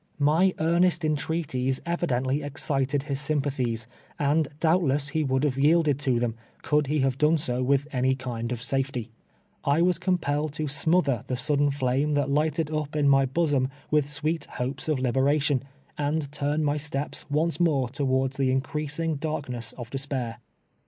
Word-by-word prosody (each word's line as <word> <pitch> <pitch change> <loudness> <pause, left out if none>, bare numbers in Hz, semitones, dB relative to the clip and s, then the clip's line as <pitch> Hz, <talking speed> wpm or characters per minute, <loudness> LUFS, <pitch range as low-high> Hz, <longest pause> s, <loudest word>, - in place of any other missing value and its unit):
]Mj 160 +6 +3
earnest 170 +1 +2
entreaties 145 -4 -1
evidentlv 145 -5 0
excited 140 -1 -1
bis 140 -1 -1
sympatbies, 135 -6 -1 0.3
and 145 +1 +2
doubtless 150 -4 +2
be 155 0 0
would 130 -1 0
bave 135 -3 0
yielded 150 -1 +3
to 130 -4 +1
tbem, 120 -2 0 0.3
could 150 0 +2
be 150 0 +1
bave 135 0 0
done 155 +2 +4
so 130 -4 0
Avitb 140 +2 +2
any 130 +1 +2
kind 120 -3 -4
of 120 -1 -3
safety, 135 -3 -1 0.5
I 145 +4 +3
was 180 -2 +2
compelled 155 -5 0
to 155 - -3
sraotber 150 -3 +1
tbe 125 - -2
sudden 145 +2 +2
flame 140 +2 0
tbat 145 -2 +1
ligbted 155 +1 0
up 155 0 -3
my 135 -1 +5
bosom 140 -2 +1 0.2
witb 150 -2 +3
sweet 155 +2 -2
bopes 130 +7 -3
of 155 - +2
liberation, 135 +2 +2 0.4
and 145 0 -1
turn 150 +1 -1
my 145 0 +1
steps 145 -1 -4
once 160 +4 +1
more 145 -7 +2
towards 130 0 0
tbe 135 -1 +2
increasing 150 +4 -1
darkness 135 -6 -4
of 120 -2 -9
despair. 130 -4 -3
145 Hz, 160 wpm, -26 LUFS, 130-155 Hz, 0.5 s, my